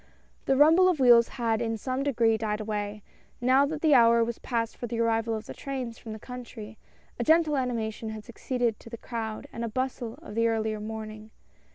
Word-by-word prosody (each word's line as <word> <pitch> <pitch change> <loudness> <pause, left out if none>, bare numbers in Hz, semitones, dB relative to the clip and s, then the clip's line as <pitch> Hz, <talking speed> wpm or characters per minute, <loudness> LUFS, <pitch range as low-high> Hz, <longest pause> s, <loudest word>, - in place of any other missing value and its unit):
The 270 - +2
rumble 325 +6 +6
of 345 -5 0
wheels 240 -3 +6
had 230 -2 0
in 225 -1 -1
some 255 +4 -3
degree 235 -5 +2
died 215 -1 -2
away, 210 -1 -4 0.4
now 260 +3 +4
that 305 +1 -5
the 310 -2 +5
hour 235 -2 +6
was 235 0 -4
past 230 -2 -2
for 240 - -6
the 230 0 -4
arrival 225 0 +1
of 215 0 -6
the - - -8
trains 255 -4 -5
from 225 - -9
the 215 - -6
country 230 -2 -9 0.2
— - - -33
a - - +1
gentle 315 -1 +4
animation 230 -4 -2
had 215 -1 -7
succeeded 240 -2 -2
to - - -13
the 230 - -7
crowd 225 -2 -5
and 230 -1 -4
bustle 255 -3 -3
of - - -9
the 230 +1 +2
earlier 220 -1 -1
morning. 215 0 -7
230 Hz, 205 wpm, -27 LUFS, 220-255 Hz, 0.4 s, rumble